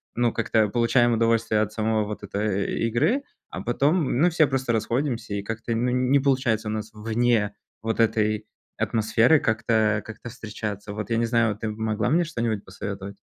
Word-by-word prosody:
ну, 120 Hz, 0 st, +2 dB
как-то 110 Hz, -2 st, +2 dB
получаем 120 Hz, +2 st, +3 dB
удовольствие 115 Hz, -1 st, +2 dB
от 105 Hz, 0 st, -2 dB
самой 110 Hz, 0 st, +1 dB
вот 105 Hz, 0 st, -6 dB
этой 100 Hz, 0 st, -2 dB
игры, 165 Hz, -, +1 dB, 0.3 s
а -, -, -6 dB
потом, 140 Hz, +3 st, +1 dB
ну, 175 Hz, +4 st, +5 dB
все 160 Hz, -2 st, +4 dB
просто 130 Hz, -3 st, -1 dB
расходимся, 120 Hz, 0 st, -1 dB
и 100 Hz, -, -3 dB
как-то, 115 Hz, +2 st, -4 dB
ну, 120 Hz, +2 st, 0 dB
не 125 Hz, +2 st, +3 dB
получается 130 Hz, -6 st, +1 dB
у -, -, -2 dB
нас 110 Hz, 0 st, -4 dB
вне 110 Hz, 0 st, 0 dB, 0.3 s
вот 110 Hz, +1 st, -2 dB
этой 110 Hz, -1 st, +1 dB, 0.3 s
атмосферы 115 Hz, +6 st, +3 dB
как-то 110 Hz, -2 st, +1 dB
как-то 110 Hz, +2 st, -9 dB
встречаться. 105 Hz, -3 st, -6 dB
Вот, 105 Hz, +2 st, -5 dB
я 115 Hz, -, +2 dB
не 115 Hz, -, +2 dB
знаю, 115 Hz, -2 st, +2 dB
ты 110 Hz, 0 st, -3 dB
могла 110 Hz, -1 st, -1 dB
мне 170 Hz, +3 st, +3 dB
что-нибудь 115 Hz, -9 st, -2 dB
посоветовать? 100 Hz, 0 st, -6 dB
115 Hz, 170 wpm, -25 LUFS, 105-120 Hz, 0.3 s, ну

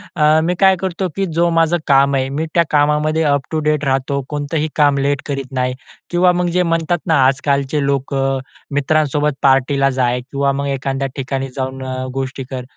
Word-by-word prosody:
अ, 155 Hz, -1 st, +4 dB
मी 180 Hz, +2 st, 0 dB
काय 190 Hz, -1 st, +5 dB
करतो 190 Hz, 0 st, -2 dB
की 195 Hz, -, 0 dB
जो 170 Hz, 0 st, +3 dB
माझं 165 Hz, +1 st, +2 dB
काम 140 Hz, 0 st, +4 dB
आहे 130 Hz, 0 st, 0 dB
मी 150 Hz, +4 st, -2 dB
त्या 170 Hz, -, +4 dB
कामामध्ये 150 Hz, +2 st, +2 dB
अप 140 Hz, -2 st, +2 dB
टू 160 Hz, -, 0 dB
डेट 150 Hz, -1 st, 0 dB
राहतो. 135 Hz, +1 st, 0 dB
कोणतंही 150 Hz, +1 st, -2 dB
काम 145 Hz, -2 st, +3 dB
लेट 140 Hz, 0 st, 0 dB
करीत 135 Hz, -2 st, -4 dB
नाही 125 Hz, -1 st, -1 dB, 0.4 s
किंवा 180 Hz, +1 st, +3 dB
मग 180 Hz, 0 st, 0 dB
जे 180 Hz, -, +3 dB
म्हणतात 165 Hz, 0 st, 0 dB
ना 155 Hz, -5 st, +4 dB
आजकालचे 140 Hz, +1 st, +1 dB
लोकं 135 Hz, -1 st, 0 dB
अ, -, -, -4 dB, 0.3 s
मित्रांसोबत 150 Hz, 0 st, +1 dB
पार्टीला 135 Hz, +1 st, +3 dB
जा 130 Hz, -2 st, +1 dB
किंवा 140 Hz, +2 st, -1 dB
मग 140 Hz, +1 st, -2 dB
एखाद्या 135 Hz, 0 st, -2 dB
ठिकाणी 135 Hz, 0 st, -3 dB
जाऊन 130 Hz, 0 st, -4 dB
अ, 130 Hz, 0 st, -4 dB
गोष्टी 135 Hz, 0 st, -4 dB
कर, 130 Hz, -2 st, -5 dB
140 Hz, 190 wpm, -17 LUFS, 135-155 Hz, 0.4 s, काय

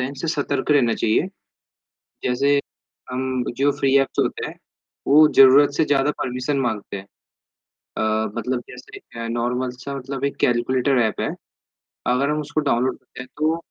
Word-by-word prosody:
है 125 Hz, -, 0 dB
इनसे 140 Hz, +4 st, -6 dB
सतर्क 145 Hz, -2 st, -1 dB
रहना 125 Hz, -6 st, +4 dB
चाहिए। 115 Hz, +10 st, +1 dB, 1.0 s
जैसे 140 Hz, +3 st, +2 dB, 0.5 s
अम, 130 Hz, 0 st, -2 dB
जो 140 Hz, +1 st, +3 dB
फ्री 135 Hz, 0 st, +2 dB
ऐप्स 135 Hz, -, -1 dB
होते -, -, -1 dB
हैं, -, -, -9 dB, 0.5 s
वो 150 Hz, +2 st, +7 dB
ज़रूरत 135 Hz, +2 st, +7 dB
से 160 Hz, -, +3 dB
ज़्यादा 140 Hz, 0 st, +2 dB
परमिशन 130 Hz, +3 st, -2 dB
माँगते 110 Hz, -5 st, -3 dB
हैं। 95 Hz, -, -10 dB, 0.9 s
अ, 110 Hz, -1 st, 0 dB
मतलब 120 Hz, +2 st, -2 dB
जैसे 125 Hz, 0 st, -11 dB
एक -, -, -16 dB
नॉर्मल 125 Hz, +2 st, -1 dB
सा 140 Hz, 0 st, -4 dB
मतलब 135 Hz, +1 st, -5 dB
एक 140 Hz, -, -1 dB
कैलकुलेटर 125 Hz, +2 st, +2 dB
ऐप 110 Hz, -, -1 dB
है, -, -, -1 dB, 0.8 s
अगर 130 Hz, +4 st, +1 dB
हम 150 Hz, 0 st, 0 dB
उसको 150 Hz, +1 st, -2 dB
डाउनलोड 130 Hz, -3 st, 0 dB
करते 130 Hz, 0 st, -14 dB
हैं 125 Hz, -, -7 dB
तो, 155 Hz, +2 st, +1 dB
130 Hz, 160 wpm, -22 LUFS, 125-140 Hz, 1.0 s, वो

